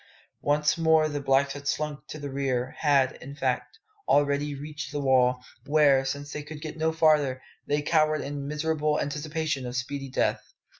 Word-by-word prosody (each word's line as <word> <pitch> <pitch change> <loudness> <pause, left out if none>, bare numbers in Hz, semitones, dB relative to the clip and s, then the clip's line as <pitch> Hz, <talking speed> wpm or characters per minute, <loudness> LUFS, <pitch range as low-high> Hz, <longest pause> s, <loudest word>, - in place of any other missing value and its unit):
Once 150 +2 +2
more 160 -1 +4
the 145 -1 -3
blacks 135 0 +2
had 145 0 -8
slunk 150 -2 -2
to - - -7
the 145 -2 -6
rear 130 -2 -1
had, 140 -4 +3
in 140 +2 -9
fact, 130 - -2 0.3
already 145 0 +2
reached 150 +2 -7
the 145 - -3
wall, 130 -2 +3 0.2
where, 145 -3 +5
since 145 +2 -4
they 150 - -4
could 150 +1 -9
get 155 0 -6
no 160 0 +1
farther, 150 -5 +3 0.3
they 145 0 0
cowered 155 0 +2
in 140 0 -5
miserable 150 0 0
anticipation 150 -1 -2
of 125 - -6
speedy 135 +2 -4
death. - - -1
145 Hz, 170 wpm, -27 LUFS, 135-150 Hz, 0.3 s, where